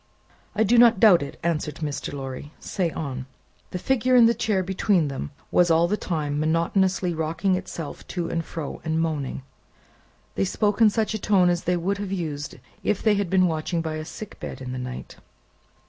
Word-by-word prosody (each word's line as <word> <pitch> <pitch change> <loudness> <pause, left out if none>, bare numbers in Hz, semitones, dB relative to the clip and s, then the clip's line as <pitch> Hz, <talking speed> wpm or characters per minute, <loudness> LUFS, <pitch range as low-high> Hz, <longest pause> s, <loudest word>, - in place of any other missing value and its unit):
"I 220 - +3
do 230 +3 +4
not 235 -4 +6
doubt 190 -7 +7
it," 140 - -7
answered 155 -3 -1
Mr. 150 -3 -4
Lorry. 135 +1 -6
"Say 180 -3 -1
on." 135 -5 -5 0.4
The - - -4
figure 255 +5 +2
in 240 -2 +8
the 230 - +5
chair 205 -5 0
between 185 -3 +1
them, 135 +1 -5 0.2
was 175 -1 +4
all 165 +1 +4
the 205 - +1
time 150 -7 -2
monotonously 175 +3 +1
rocking 165 +4 0
itself 180 -4 -5
to 175 -3 -3
and 165 0 -2
fro, 155 -2 -6
and 160 0 0
moaning. 150 -5 -2 0.9
They 95 - 0
spoke 205 - 0
in 220 - +8
such 220 +1 0
a 220 - -2
tone 190 -3 +4
as 175 -1 -2
they 180 0 +2
would 195 +4 -1
have 200 -2 -4
used 155 -5 -4 0.3
if 210 - 0
they 215 - +4
had 200 -3 0
been 185 0 +4
watching 165 0 -1
by 155 -1 -3
a 155 - -4
sick 210 +5 -9
bed - - -6
in 130 -1 -6
the 130 - -4
night. 125 0 -7
170 Hz, 195 wpm, -25 LUFS, 155-195 Hz, 0.9 s, in